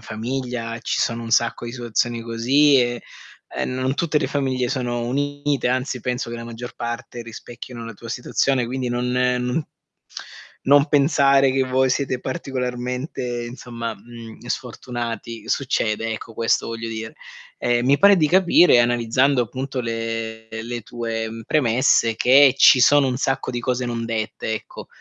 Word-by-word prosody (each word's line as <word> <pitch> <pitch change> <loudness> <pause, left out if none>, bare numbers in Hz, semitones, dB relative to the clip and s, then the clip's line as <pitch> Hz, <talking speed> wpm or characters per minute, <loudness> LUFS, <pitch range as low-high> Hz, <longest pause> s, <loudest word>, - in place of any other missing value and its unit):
famiglia 115 0 -4
ci - - -1
sono 115 0 -1
un 115 - -7
sacco 120 0 +1
di 120 - -6
situazioni 120 -1 -1
così 130 +6 +3
e, 120 -1 -1 0.5
uhm, - - -2
non 130 +1 -1
tutte 155 -1 +1
le - - -1
famiglie 130 -3 -1
sono 120 -2 -2
unite, 145 +1 -1
anzi 130 0 -1
penso 125 +1 -3
che 120 - -5
la 115 - -7
maggior 120 +1 -8
parte 120 0 -5
rispecchino 120 +1 -9
la 115 - -7
tua 115 +3 -11
situazione, 125 +1 0
quindi 130 0 -3
non 120 +1 -1
non 125 +3 0 1.0
non 140 +1 +5
pensare 140 -2 +4
che 135 0 +1
voi 130 0 +1
siete 130 -1 -1
particolarmente, 125 -3 -4
insomma, 115 -2 -6
mhmm, 115 +2 -12
sfortunati. 120 -1 -5
Succede, 115 -4 0
ecco, 110 +1 -8
questo 115 0 +1
voglio 115 0 -5
dire. 110 0 -6 0.4
Ehm, 120 0 +1
mi 140 +2 +4
pare 200 +4 +7
di 155 -3 +3
capire, 175 -5 +5
analizzando 120 +3 +2
appunto 130 +3 -4
le 115 -1 -4 0.2
le 120 +1 -5
tue 115 0 -4 0.2
premesse, 125 -4 +3
mhmm, - - -4
che 135 +1 +6
ci 135 - +7
sono 140 +1 +5
un 125 - -1
sacco 135 0 -1
di 120 - -3
cose 125 0 -1
non 120 -1 -3
dette, 110 -1 -3
ecco. 110 - -8
120 Hz, 155 wpm, -22 LUFS, 115-130 Hz, 1.0 s, pare